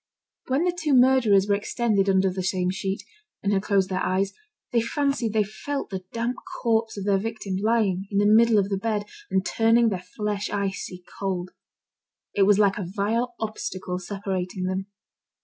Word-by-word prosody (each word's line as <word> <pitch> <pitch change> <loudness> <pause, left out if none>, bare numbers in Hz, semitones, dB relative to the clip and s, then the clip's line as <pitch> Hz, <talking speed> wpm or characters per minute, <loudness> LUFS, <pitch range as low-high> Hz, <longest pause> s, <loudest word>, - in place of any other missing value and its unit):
When 265 +5 +1
the 355 -1 +1
two 315 -5 +1
murderers 245 -6 +5
were 205 - +3
extended 205 -1 +1
under 190 0 +3
the 185 +1 -3
same 180 0 0
sheet, 195 +1 -3 0.4
and 205 0 +1
had 195 - +2
closed 195 -2 +1
their 185 - 0
eyes, 190 +1 0 0.4
they 235 - +3
fancied 275 -1 0
they 215 -1 +3
felt 220 +6 -5
the 185 -1 -5
damp 235 +2 -2 0.3
corpse 225 -2 +1
of 195 - -4
their 200 -1 +3
victim, 210 -3 -3
lying 200 -3 +1
in 200 - -2
the 205 - +4
middle 225 +1 +6
of 200 -1 +2
the 195 -1 -1
bed, 210 -1 -1 0.2
and 190 0 +1
turning 225 +5 +3
their 190 -4 -3
flesh 205 +2 -3
icy 195 -2 -3 0.2
cold. 185 -2 -2 0.8
It 195 -1 +3
was 205 -1 +5
like 200 -1 +3
a - - -2
vile 230 +4 0
obstacle 185 -4 -4
separating 190 -1 -4
them. 185 +1 -2
205 Hz, 180 wpm, -25 LUFS, 190-225 Hz, 0.8 s, middle